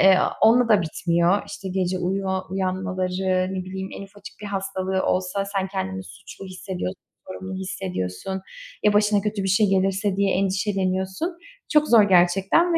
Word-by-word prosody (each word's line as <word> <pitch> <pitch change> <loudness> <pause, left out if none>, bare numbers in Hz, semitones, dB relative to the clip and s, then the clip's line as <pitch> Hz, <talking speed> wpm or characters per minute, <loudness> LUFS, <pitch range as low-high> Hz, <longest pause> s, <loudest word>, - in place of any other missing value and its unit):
ııı, - - +2 0.2
onunla 235 +2 +5
da 210 -3 +5
bitmiyor. 170 +3 +1
İşte 190 - -7
gece 185 0 0
uyuyor, 190 +1 -1
uyanmaları, 185 0 -1
ne 185 - -3
bileyim, 190 +1 -5
en - - -7
ufacık 200 0 -12
bir 210 - -6
hastalığı 190 -1 -2
olsa 185 +2 0
sen 195 -1 -2
kendini 95 - -4
suçlu 95 - -11
hissediyorsun, 185 0 -5 0.3
sorumlu 190 0 -6
hissediyorsun, 190 - -4 0.4
ya 210 - +4
başına 210 0 +3
kötü 210 -1 -2
bir - - -1
şey 200 +2 +4
gelirse 195 +1 +1
diye 200 -1 +2
endişeleniyorsun. 190 - -1 0.4
Çok 300 0 +4
zor 230 -3 +7
gerçekten 190 - +4
ve - - +4
190 Hz, 155 wpm, -24 LUFS, 185-200 Hz, 0.4 s, zor